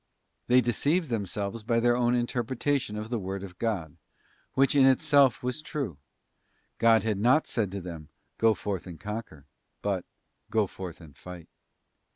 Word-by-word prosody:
They 125 +1 +6
deceived 145 +7 +1
themselves 100 0 -2
by 115 +2 +1
their 120 +1 +3
own 120 0 +2
interpretation 120 0 -1
of 110 +2 -6
the 120 - 0
word 95 0 -4
of 90 -2 -10
God, 95 -10 -2 0.6
which 135 +2 +4
in 135 -2 +7
itself 140 -2 +4
was 125 +5 -2
true. 135 - -4 0.8
God 115 -1 +5
had 110 -3 0
not 125 +8 +4
said 110 -5 -1
to 100 +1 -5
them, 85 -4 -8 0.3
go 115 -1 +4
forth 95 -3 -4
and 85 -3 -9
conquer, 105 -9 -6 0.4
but 100 -3 0 0.5
go 110 -2 +2
forth 90 -2 -8
and 75 -4 -14
fight. 90 -2 -10
110 Hz, 160 wpm, -28 LUFS, 95-125 Hz, 0.8 s, in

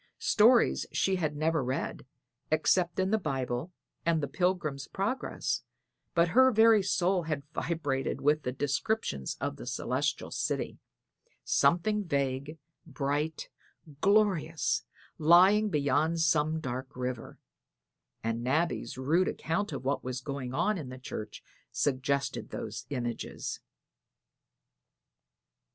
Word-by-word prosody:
Stories 235 +3 +4
she 190 -1 +1
had 155 -4 -1
never 155 0 +1
read, 130 +2 -3 0.4
except 165 +3 +2
in 190 +1 +1
the 220 - +3
Bible 135 -1 -2 0.3
and 165 -1 +2
the 145 - -2
Pilgrim's 155 -3 -1
Progress, 205 +7 -2 0.5
but 170 0 +4
her 260 +7 +6
very 225 -1 +6
soul 185 0 +1
had 155 -4 -3
vibrated 145 -7 -2
with 150 +2 +2
the 125 - -2
descriptions 140 - -1
of - - -3
the - - -9
celestial - - -1
city - - -2 0.6
something 210 +5 +2
vague, 140 -2 -2 0.3
bright, 145 +1 -2 0.5
glorious, 190 -6 +2 0.3
lying 185 +7 +6
beyond 150 +1 +1
some 160 -1 +2
dark 130 -2 -5
river; 125 -2 -4 0.9
and 115 +1 -2
Nabby's 135 -2 0
rude 160 +8 +2
account 200 +6 -2
of - - -5
what 140 +1 0
was 130 0 -3
going 135 -2 -5
on 180 +8 +1
in 140 -5 -7
the 130 - -8
church 110 -4 -7 0.3
suggested 140 0 -1
those - - -6
images. 120 -4 -4
155 Hz, 115 wpm, -30 LUFS, 135-180 Hz, 0.9 s, her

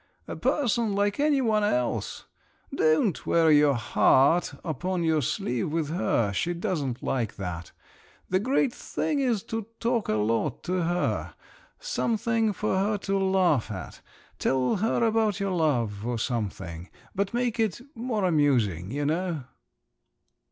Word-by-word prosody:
A - - -5
person 235 -6 +1
like 205 +2 0
any 290 -2 +3
one 215 -4 +2
else. 125 -12 -1 0.5
Don't 155 +4 +2
wear 165 -1 +4
your 145 -2 +5
heart 135 +7 +3
upon 175 +3 -2
your 160 -2 +2
sleeve 120 +1 -2
with 160 -2 -1
her—she 160 - 0
doesn't 155 - -3
like 120 -5 -1
that. 90 -3 -6 0.6
The 185 - +1
great 255 +3 +1
thing 300 -2 -2
is 240 -7 +1
to 225 -2 -4
talk 235 -2 0
a 105 - +2
lot 110 +2 0
to 180 0 -1
her… 175 +1 -1 0.4
something 230 - 0
for 205 -1 -1
her 205 +2 +1
to 195 0 -1
laugh 185 -10 +2
at. 95 -4 -7 0.4
Tell 130 - +1
her 220 +4 +1
about 220 -3 +1
your 200 -1 -1
love, 120 - 0
or 120 0 -2
something… 95 -7 -4 0.2
but 200 0 -1
make 240 -1 -1
it 220 -4 0
more 225 -4 -2
amusing, 125 - +2
you 145 +4 -2
know." 165 -1 -1
175 Hz, 140 wpm, -27 LUFS, 125-215 Hz, 0.6 s, your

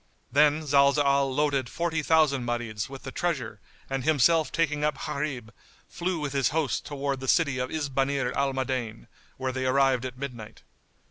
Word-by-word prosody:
Then 150 +3 +4
Zalzal 140 -1 +3
loaded 140 -3 0
forty 165 +2 -1
thousand 150 -4 +3
Marids 120 -3 -3
with 135 -1 -9
the 130 - -6
treasure 125 - -3 0.3
and 135 -1 -3
himself 155 +2 +3
taking 150 -3 0
up 150 -2 -1
Gharib, 135 -7 -4 0.3
flew 175 -1 -3
with 145 -2 -3
his 135 -2 +2
host 145 -7 -1
towards 140 -2 -3
the 130 - -5
city 145 -6 +2
of 125 0 -2
Isbanir 140 -3 -1
al 140 0 +1
Madain 130 - -3 0.3
where 130 0 -2
they 130 0 -2
arrived 130 -1 +3
at 130 -1 -6
midnight. 120 -5 -8
140 Hz, 160 wpm, -27 LUFS, 130-150 Hz, 0.3 s, Then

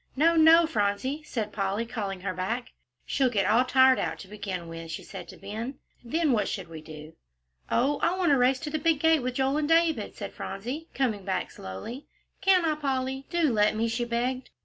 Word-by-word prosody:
"No, 330 +5 +4
no, 325 +1 +7
Phronsie," 245 +3 -1
said 225 -8 -4
Polly, 200 +2 -1
calling 200 -5 -4
her 185 -1 -2
back. 220 +8 -3 0.3
"She'll 265 -2 +2
get 200 -5 +1
all 230 +5 +4
tired 260 0 +5
out - - -2
to 195 - -11
begin 190 -4 -5
with," 165 0 -8
she 160 - -5
said - - -9
to - - -11
Ben, 225 +7 -6 0.3
"then 305 +5 +1
what 220 -4 +2
should 190 -4 -4
we 160 -1 -8
do?" 155 0 -11 0.6
"Oh, 275 +5 +2
I 355 +2 +1
want 360 -4 +2
to 280 - +5
race 255 +1 +3
to 300 - -4
the 310 - -1
big 320 0 +2
gate 320 0 +4
with 250 0 -3
Joel 270 +2 +1
and 300 0 -1
David," 330 -1 +2
said - - -7
Phronsie, 245 +12 -5
coming 225 -7 0
back 190 0 -2
slowly. 95 - -8 0.3
"Can't 370 -3 +4
I, 315 - +2
Polly? 270 -2 -2
Do 330 -7 +2
let 210 0 +3
me," 225 +2 0
she 235 +2 -1
begged. 245 +2 -2
250 Hz, 210 wpm, -27 LUFS, 205-295 Hz, 0.6 s, no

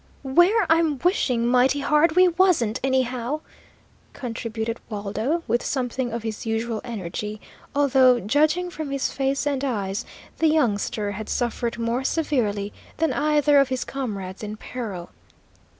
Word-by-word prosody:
"Where 350 +10 +4
I'm 325 -3 +3
wishing 255 - +2
mighty 255 +3 +3
hard 300 +3 +3
we 365 0 +7
wasn't, 335 - +2
anyhow!" 260 +1 0 0.7
contributed 230 -2 -4
Waldo, 220 +10 -2
with 240 - +1
something 250 -2 -2
of 230 0 -4
his 220 -1 -4
usual 225 0 -2
energy, 210 -1 -5 0.4
although, 265 -3 +5
judging 310 - +1
from 310 -3 -5
his 275 -1 -1
face 275 +1 -1
and 280 -2 -1
eyes, 210 -4 -2 0.4
the 325 - +4
youngster 215 -8 +1
had 210 +2 -6
suffered 235 -1 -1
more 235 +2 -1
severely 225 -10 0 0.2
than 325 0 +1
either 295 -1 +3
of 275 -1 +3
his 260 -1 -1
comrades 200 -9 -5
in 210 0 -6
peril. 210 -8 -6
250 Hz, 135 wpm, -24 LUFS, 225-290 Hz, 0.7 s, we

